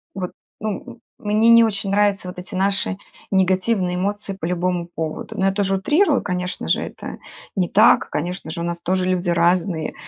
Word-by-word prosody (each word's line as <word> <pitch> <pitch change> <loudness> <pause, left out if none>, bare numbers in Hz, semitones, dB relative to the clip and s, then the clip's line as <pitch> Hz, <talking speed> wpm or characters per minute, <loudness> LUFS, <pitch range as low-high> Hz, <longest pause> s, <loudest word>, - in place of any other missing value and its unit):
вот, 185 -2 -4 0.3
ну, 225 +3 -5 0.2
мне 215 +2 +2
не 230 0 +8
очень 200 -2 -2
нравятся 205 -2 +2
вот 180 - -8
эти 185 +2 -7
наши 195 0 +1 0.3
негативные 185 0 +1
эмоции 200 +1 -2
по 165 - -4
любому 175 0 -1
поводу. 160 -1 -5
Но 190 - +1
я 195 - +4
тоже 195 -1 0
утрирую, 295 - +2
конечно 180 -1 -3
же, - - +3
это - - -7 0.4
не 180 -3 +1
так, - - +5
конечно 175 +1 -4
же, 170 - -5
у - - -2
нас 170 0 -3
тоже 185 +1 0
люди 180 -1 0
разные, 170 0 +1
190 Hz, 180 wpm, -21 LUFS, 180-205 Hz, 0.4 s, не